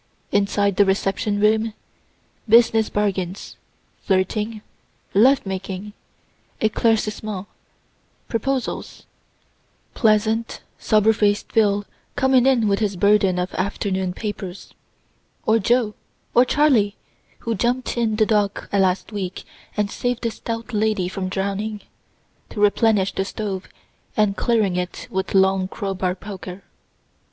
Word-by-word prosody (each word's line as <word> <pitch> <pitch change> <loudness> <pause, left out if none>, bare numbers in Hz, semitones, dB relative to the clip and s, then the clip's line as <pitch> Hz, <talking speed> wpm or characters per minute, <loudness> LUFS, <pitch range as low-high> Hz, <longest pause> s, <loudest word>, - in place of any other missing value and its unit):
Inside 200 -1 +1
the 205 - +6
reception 195 +1 0
room, 215 +1 +2 0.7
business 225 -1 +5
bargains, 195 -2 -2 0.5
flirting, 210 +3 -1 0.5
love 250 +6 +5
making, 195 +1 -5 0.7
eclaircissements, 215 -2 0 0.8
proposals 255 +3 -3 0.9
pleasant, 220 +1 +1 0.2
sober 215 0 +3
faced 205 -1 +1
Phil 205 -2 +2 0.3
coming 265 -2 +4
in 245 -5 +3
with 200 -1 +2
his 205 -3 0
burden 195 -1 +3
of 180 +1 -2
afternoon 190 -1 -1
papers 195 -2 -6 0.7
or 220 +1 +4
Jo, 230 +1 +2 0.4
or 245 - +6
Charley 250 -9 +3 0.5
(who 230 - -2
jump'd 245 +4 -1
in 230 -3 +1
the 215 0 +3
dock 205 -2 0
last 190 0 +1
week, 190 -3 -4 0.3
and 205 -1 0
saved 245 -1 -2
a 230 - +1
stout 230 +1 -6
lady 210 -3 +1
from 185 0 -4
drowning,) 200 +2 -2 0.7
to - - -7
replenish 205 -1 +3
the 195 - -1
stove, 195 -1 -5 0.5
and 210 -2 +3
clearing 215 -7 +1
it 180 0 -4
with 190 +1 -2
long 190 -1 +3
crow 195 0 -4
bar 185 -1 -1
poker. 190 -1 -8
210 Hz, 115 wpm, -22 LUFS, 195-225 Hz, 0.9 s, the